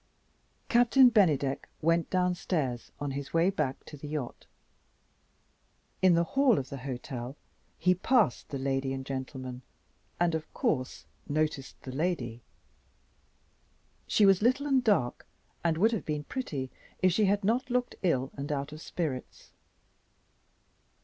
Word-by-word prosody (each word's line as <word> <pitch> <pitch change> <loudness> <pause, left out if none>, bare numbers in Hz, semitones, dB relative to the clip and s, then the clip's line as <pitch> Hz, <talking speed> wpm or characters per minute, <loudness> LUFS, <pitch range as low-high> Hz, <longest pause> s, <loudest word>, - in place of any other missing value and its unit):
Captain 245 +2 +6
Bennydeck 150 - +2
went 165 +1 +2
downstairs, 175 -8 -1
on 145 -1 -2
his 140 +3 -5
way 170 +3 +4
back 150 -8 -2
to - - -10
the 150 +1 -8
yacht. 145 -5 -5 1.5
In 185 -2 +6
the 170 - +3
hall 265 +5 +3
of 135 - -3
the 140 - -6
hotel 125 -1 -6 0.4
he 180 - +3
passed 210 - +2
the 140 - -3
lady 135 0 -1
and 135 0 -5
gentleman 130 -1 -5 0.6
and, 175 -1 +2
of 160 -1 -4
course, 130 -3 -1 0.2
noticed 150 -2 -1
the 130 - -6
lady. 130 -6 -2 1.7
She 210 - +4
was 195 -1 +5
little 255 +5 +2
and 270 -3 +3
dark 200 - +1 0.4
and 165 -2 +2
would 220 +7 +4
have 220 -8 -2
been 150 -1 -2
pretty, 145 - -4 0.3
if 185 - +6
she 210 +4 +3
had 200 +1 +2
not 245 +6 +1
looked 245 0 0
ill 135 -7 +1
and 140 +1 -4
out 140 0 -2
of 155 +1 -9
spirits. 150 -9 -5
155 Hz, 140 wpm, -30 LUFS, 135-195 Hz, 1.7 s, Captain